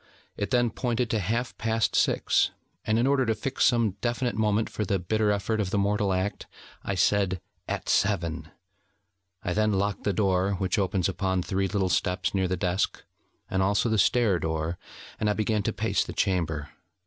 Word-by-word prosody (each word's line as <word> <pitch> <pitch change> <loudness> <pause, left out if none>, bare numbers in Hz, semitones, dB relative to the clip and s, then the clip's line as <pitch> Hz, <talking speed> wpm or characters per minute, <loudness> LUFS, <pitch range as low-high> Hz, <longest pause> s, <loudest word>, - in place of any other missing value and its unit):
It 100 - -3
then 120 -2 +2
pointed 120 -1 -1
to 110 - +1
half 115 +6 -2
past 115 0 0
six, - - +3 0.4
and 110 - +2
in 120 - +2
order 135 -1 +3
to 115 -3 +1
fix 135 +4 0
some 115 -6 +2
definite 120 0 0
moment 105 +1 +1
for 105 - -3
the 100 -1 0
bitter 105 +4 0
effort 105 +2 0
of 100 -3 0
the 100 - -1
mortal 100 0 +1
act, 95 +2 -2 0.4
I 100 - -2
said: 95 0 +2 0.3
'At - - -4
Seven.' 85 -5 0 0.9
I 90 - -1
then 110 +1 +2
locked 100 +1 -1
the 100 - +1
door 95 0 +1
which 95 +1 0
opens 95 -2 +1
upon 95 -1 -1
three 95 0 0
little 95 -1 0
steps 90 +1 0
near 95 -1 +1
the 90 0 -1
desk, 90 +1 -1 0.4
and 95 - 0
also 100 +4 +2
the 110 -1 +2
stair 110 -5 +3
door; 80 +1 -2 0.4
and 105 - +1
I - - +3
began 110 0 0
to - - -1
pace - - 0
the - - -7
chamber. 80 -6 -1
100 Hz, 185 wpm, -27 LUFS, 95-110 Hz, 0.9 s, six